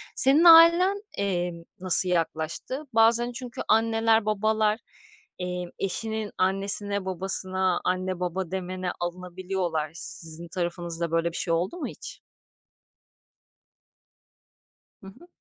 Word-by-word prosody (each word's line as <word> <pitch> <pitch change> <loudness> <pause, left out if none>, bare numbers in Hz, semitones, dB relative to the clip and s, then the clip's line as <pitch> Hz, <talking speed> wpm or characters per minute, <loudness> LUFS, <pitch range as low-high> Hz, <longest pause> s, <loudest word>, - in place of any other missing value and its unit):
senin 275 +5 +5
ailen, 340 +4 +6 0.2
eee, 180 -3 -2 0.3
nasıl 185 0 +5
yaklaştı? 170 - -3
Bazen 230 +2 +3
çünkü 245 -1 -8
anneler, 225 0 +2
babalar, 215 +1 0 0.6
eee, 180 0 -4
eşinin 220 +2 -3
annesine, 200 +1 +1
babasına, 185 0 0
"anne, 185 0 -2
baba" 180 0 -4
demene 185 -1 -4
alınabiliyorlar. 175 -2 -4
Sizin 165 0 +1
tarafınızda 170 -1 -3
böyle 165 0 0
bir 170 - -2
şey 165 - -1
oldu 175 - -2
mu 340 - -4
hiç? - - -10 2.8
Hı 195 - -13
hı. 260 - -15
190 Hz, 105 wpm, -25 LUFS, 175-220 Hz, 2.8 s, ailen